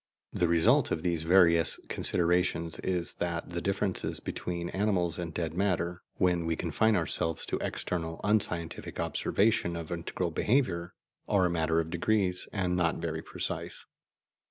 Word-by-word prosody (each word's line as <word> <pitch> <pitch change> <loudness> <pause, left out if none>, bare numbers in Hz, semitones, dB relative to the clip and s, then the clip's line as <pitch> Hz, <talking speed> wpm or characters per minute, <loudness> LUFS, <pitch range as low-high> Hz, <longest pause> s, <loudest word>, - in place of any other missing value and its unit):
The 85 - +2
result 85 -1 +4
of 80 - -2
these 85 -3 0
various 85 -1 +5
considerations 85 -1 0
is 90 -2 0
that 85 0 -2
the 85 0 -2
differences 100 -1 -1
between 85 -1 -4
animals 95 -5 0
and 85 -2 -4
dead 80 -1 -3
matter, 90 -2 0
when 90 -2 +1
we 80 - +1
confine 110 +7 +1
ourselves 80 -2 0
to - - -2
external 80 -2 -3
unscientific 95 -6 -1
observation 100 -5 +1
of 85 0 -6
integral 85 +1 -2
behaviour, 90 - 0 0.3
are 95 -3 +3
a 90 - +1
matter 80 -1 +1
of 80 0 -2
degree 95 +1 +1 0.2
and 90 -3 0
not 85 -2 +2
very 80 -1 -3
precise. - - -4
85 Hz, 145 wpm, -30 LUFS, 85-90 Hz, 0.3 s, various